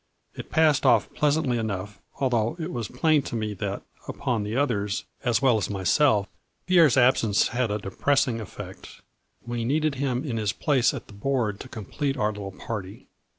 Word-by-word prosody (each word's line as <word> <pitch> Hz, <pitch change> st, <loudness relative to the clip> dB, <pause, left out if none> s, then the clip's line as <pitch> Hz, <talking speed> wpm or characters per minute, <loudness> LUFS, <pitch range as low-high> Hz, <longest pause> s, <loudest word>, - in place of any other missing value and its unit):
It -, -, -9 dB
passed 155 Hz, -2 st, +3 dB
off -, -, +3 dB
pleas 150 Hz, 0 st, +2 dB
antly 130 Hz, -7 st, 0 dB
enough, 100 Hz, -2 st, -4 dB, 0.2 s
although 120 Hz, -1 st, +1 dB
it 165 Hz, +1 st, -4 dB
was 120 Hz, -7 st, -3 dB
plain 155 Hz, +3 st, +2 dB
to 130 Hz, -, -6 dB
me 110 Hz, -2 st, -2 dB
that, 100 Hz, 0 st, -4 dB, 0.2 s
upon 125 Hz, -6 st, -2 dB
the 105 Hz, +2 st, -3 dB
others 105 Hz, -8 st, 0 dB, 0.2 s
as 120 Hz, +1 st, +1 dB
well 125 Hz, -5 st, +4 dB
as -, -, -2 dB
myself, 100 Hz, -, +2 dB, 0.4 s
Pierre's 170 Hz, -8 st, +5 dB
absence 120 Hz, -5 st, +4 dB
had 120 Hz, 0 st, 0 dB
a 105 Hz, -, 0 dB
depressing 120 Hz, +4 st, 0 dB
effect. 105 Hz, -, -10 dB, 0.4 s
We 120 Hz, -1 st, -3 dB
needed 150 Hz, +5 st, +1 dB
him 130 Hz, -2 st, 0 dB
in 120 Hz, -6 st, -2 dB
his 105 Hz, -1 st, 0 dB
place 130 Hz, -1 st, +2 dB
at -, -, -7 dB
the -, -, -15 dB
board 110 Hz, -2 st, -1 dB
to 130 Hz, -, -9 dB
complete 135 Hz, +6 st, -3 dB
our 105 Hz, 0 st, +1 dB
little 100 Hz, -2 st, -6 dB
party. 100 Hz, 0 st, -7 dB
120 Hz, 180 wpm, -26 LUFS, 105-140 Hz, 0.4 s, Pierre's